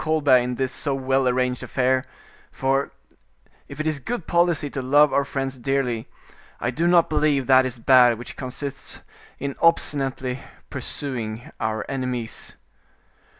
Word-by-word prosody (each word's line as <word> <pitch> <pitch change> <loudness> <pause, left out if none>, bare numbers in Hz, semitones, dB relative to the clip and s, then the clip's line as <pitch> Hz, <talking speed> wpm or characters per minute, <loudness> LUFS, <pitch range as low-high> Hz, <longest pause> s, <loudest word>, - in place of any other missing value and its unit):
Colbert 155 -4 +4
in 125 0 -2
this 130 0 -1
so 140 0 -2
well 135 0 +1
arranged 125 0 0
affair; 130 0 +1 0.5
for, 135 +1 0 0.8
if - - -10
it 155 - -2
is 155 -2 -1
good 210 - -4
policy 170 -3 +2
to 140 -1 -4
love 145 +3 +4
our 140 - +3
friends 135 -2 -4
dearly, 125 -3 -1 0.5
I 120 - -1
do 165 +7 0
not 175 -1 +5
believe 150 -3 +1
that 130 0 +5
is 130 -1 -7
bad 125 -1 +5
which 120 - -9
consists 135 +2 -7 0.4
in 140 0 -4
obstinately 135 -5 +1 0.3
pursuing 120 -5 -4
our 110 -1 -2
enemies." 125 -4 -4
135 Hz, 145 wpm, -23 LUFS, 125-145 Hz, 0.8 s, not